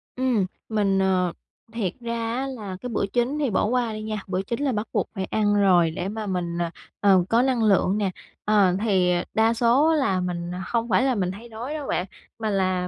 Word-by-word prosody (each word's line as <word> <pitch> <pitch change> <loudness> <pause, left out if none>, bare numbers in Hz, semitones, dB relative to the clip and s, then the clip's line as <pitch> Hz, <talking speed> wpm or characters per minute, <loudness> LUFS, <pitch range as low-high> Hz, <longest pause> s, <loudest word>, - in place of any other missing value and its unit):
Ừm, 250 -6 +1 0.2
mình, 200 -3 +1
ờ 185 -2 +2 0.4
thiệt 200 -6 -2
ra 230 -1 -2
á 265 +2 -2
là 210 -8 -6
cái 250 - -5
bữa 225 - 0
chính 250 +5 +1
thì 285 -3 +1
bỏ 200 - +1
qua 240 0 0
đi 215 - -5
nha. 215 0 -3
Bữa 185 0 -1
chính 235 +5 -4
là 280 - +1
bắt 215 -1 -2
buộc - - 0
phải 190 -2 -2
ăn 205 +1 +1
rồi 180 -5 +4
để 180 +3 -3
mà 215 +1 -4
mình, 175 -3 -2
à, 170 -1 -1 0.3
ờ, 195 -3 +5
có 230 +1 +4
năng 255 -3 +1
lượng 195 -1 +3
nè. 200 -3 0 0.3
Ờ, 200 -4 +4
thì 190 -5 +3 0.2
đa 225 +1 +3
số 245 +7 +3
là 270 -12 +1
mình 175 -1 -3 0.2
không 235 0 -1
phải 205 +4 +3
là 265 -2 +2
mình 185 -3 0
thấy 225 +5 -10
đói 235 +6 -6
đâu 300 -3 -5
bạn. 180 - 0 0.3
Mà 220 -1 -1
là 185 -2 0
210 Hz, 225 wpm, -24 LUFS, 185-235 Hz, 0.4 s, ờ